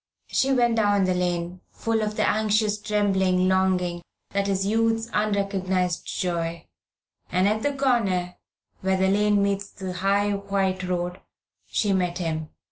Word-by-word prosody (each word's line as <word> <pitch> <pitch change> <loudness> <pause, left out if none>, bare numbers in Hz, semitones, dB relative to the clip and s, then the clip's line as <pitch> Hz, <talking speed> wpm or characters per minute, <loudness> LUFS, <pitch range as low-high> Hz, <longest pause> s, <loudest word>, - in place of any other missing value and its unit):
She 270 - +1
went 240 -3 +3
down 205 -2 +3
the 185 0 +2
lane, 175 0 -2
full 225 -1 -1
of 210 0 -2
the - - +1
anxious 215 -1 +1
trembling 190 -3 +2
longing 185 -2 +1 0.3
that 200 0 0
is 195 -1 0
youth's 225 +2 +1
unrecognised 195 -4 0
joy, 170 -2 -2 0.7
and 185 +2 +3
at 215 +1 +1
the 285 +3 -1
corner, 200 -10 +1 0.5
where 190 0 +1
the 190 0 +2
lane 205 0 +3
meets 200 0 -1
the 190 -2 -6
high 200 +2 +1
white 195 -2 -1
road, 180 0 -2 0.5
she 205 -2 0
met 180 -2 0
him. 160 -3 -3
195 Hz, 145 wpm, -25 LUFS, 180-210 Hz, 0.7 s, went